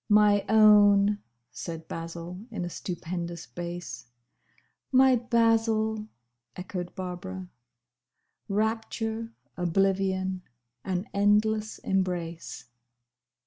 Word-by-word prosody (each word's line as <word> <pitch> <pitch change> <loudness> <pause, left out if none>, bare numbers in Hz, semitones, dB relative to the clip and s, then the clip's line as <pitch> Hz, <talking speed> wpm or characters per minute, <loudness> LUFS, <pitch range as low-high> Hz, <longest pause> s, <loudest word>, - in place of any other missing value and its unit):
"My 210 -1 +5
own!" 205 -1 +6 0.3
said 165 -1 -7
Basil, 170 +2 -6
in 215 -6 -4
a 175 - -5
stupendous 175 -1 -5
bass. 175 -8 -7 0.8
"My 260 0 +6
Basil!" 225 -2 +2 0.5
echoed 180 -1 -6
Barbara. 185 0 -6 1.0
Rapture. 225 +2 -2 0.2
Oblivion. 190 +1 +1 0.4
An 185 +1 -2
endless 210 +1 +2
embrace. 175 -7 -2
195 Hz, 75 wpm, -28 LUFS, 175-215 Hz, 1.0 s, own